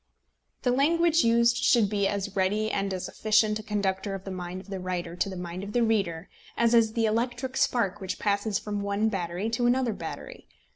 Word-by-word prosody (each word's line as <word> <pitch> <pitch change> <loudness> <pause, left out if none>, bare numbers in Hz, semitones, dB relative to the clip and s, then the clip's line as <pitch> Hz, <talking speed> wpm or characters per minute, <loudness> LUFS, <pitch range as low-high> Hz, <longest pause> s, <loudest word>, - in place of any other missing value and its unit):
The 250 - +2
language 330 +5 +3
used 235 +1 +4
should 230 -4 +4
be 200 -1 0
as 200 0 -3
ready 210 +3 +1
and 195 0 -1
as 185 -1 -3
efficient 215 0 +2
a - - -5
conductor 200 -2 -2
of 190 - -8
the 195 - -6
mind 180 0 -5
of 200 - -15
the 190 - -3
writer 180 -2 -4
to 195 - 0
the 190 - -6
mind 180 +1 -6
of 205 +1 -7
the 240 - +3
reader 195 -7 0 0.3
as 235 0 +3
is 225 -2 +4
the 230 -1 +1
electric 245 +4 -1
spark 210 -7 +1
which 190 -1 -4
passes 205 0 0
from 205 -1 -4
one 200 +2 0
battery 180 0 -3
to 240 +1 +1
another 245 -2 +2
battery. - - -8
205 Hz, 205 wpm, -27 LUFS, 190-230 Hz, 0.3 s, used